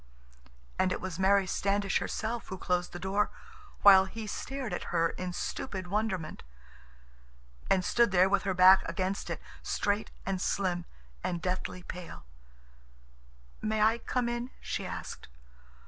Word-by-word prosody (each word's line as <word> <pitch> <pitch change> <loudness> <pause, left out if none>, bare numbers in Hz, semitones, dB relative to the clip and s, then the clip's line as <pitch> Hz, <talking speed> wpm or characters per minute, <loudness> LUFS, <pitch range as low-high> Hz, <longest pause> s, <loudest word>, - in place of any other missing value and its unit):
And 185 - +3
it - - -1
was 185 -2 -5
Mary 195 +1 +4
Standish 200 +1 +1
herself 230 +1 -3
who 190 - -5
closed 180 -1 -1
the - - -6
door, 195 +3 0 0.5
while 195 -2 +9
he 220 +3 -7
stared 265 +4 -4
at - - -3
her 165 -1 +1
in 180 0 -4
stupid 185 +1 -4
wonderment—and - - -5
stood 235 0 +4
there 185 -1 +5
with 200 +1 +2
her 195 -2 -1
back 185 +1 +8
against 190 +1 -2
it, - - -3 0.2
straight 205 +1 -1 0.2
and 190 -1 -1
slim 180 -4 0 0.4
and 175 - -1
deathly 180 +1 -3
pale. 180 - -8 1.4
"May 215 0 0
I 225 +2 +4
come 245 +1 -1
in?" 240 +1 -2
she - - -4
asked. - - -7
190 Hz, 140 wpm, -30 LUFS, 175-205 Hz, 1.4 s, while